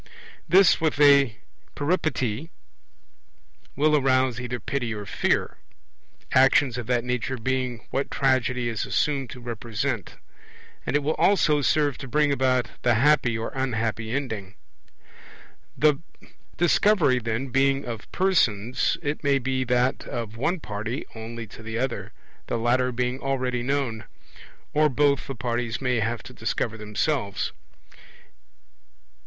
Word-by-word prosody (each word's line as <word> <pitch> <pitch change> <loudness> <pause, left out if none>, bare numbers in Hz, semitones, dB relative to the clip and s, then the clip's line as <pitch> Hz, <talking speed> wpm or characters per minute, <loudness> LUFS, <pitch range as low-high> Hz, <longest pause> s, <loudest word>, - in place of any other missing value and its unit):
This, 185 0 +6
with 155 -3 0
a 140 -5 +6 0.4
Peripety, 145 - -1 1.3
will 150 +2 +3
arouse 130 -3 +2
either 125 0 -4
pity 120 -5 -3
or 105 -1 -6
fear - - 0 0.7
actions 130 -1 +4
of 120 - -6
that 120 -2 +1
nature 125 +1 -2
being 125 0 -2
what 135 - -1
Tragedy 125 -2 +1
is 115 -3 -2
assumed 140 -4 0
to 125 - -9
represent; 115 -2 -4 0.7
and - - 0
it 145 - +2
will 155 +3 +1
also 155 -7 +3
serve 145 0 +1
to 135 - -7
bring 150 +2 +2
about 130 -5 +1
the 120 -1 +3
happy 125 -2 +3
or 115 - -4
unhappy 115 -4 -2
ending. 110 -7 -4 1.2
The 150 -2 +4 0.6
Discovery, 175 -6 +3
then, 115 +3 -3
being 135 +2 +2
of 115 -3 -7
persons, 125 - +1
it 145 +2 -3
may 140 -1 +3
be 130 0 -1
that 125 +1 +1
of 115 -2 -5
one 165 +10 -1
party 110 +3 -4
only 115 +1 -7
to 110 - -13
the 110 0 -5
other, 125 0 -3 0.4
the - - -1
latter 125 +2 +1
being 125 +1 -2
already 130 -3 -1
known; 125 -4 -2 0.7
or 150 0 +4
both 140 +1 +2
the 135 - -5
parties 120 -1 -2
may 125 -3 0
have 115 +1 -2
to - - -11
discover 110 - -2
themselves. 105 +1 -2
125 Hz, 135 wpm, -25 LUFS, 115-140 Hz, 1.3 s, This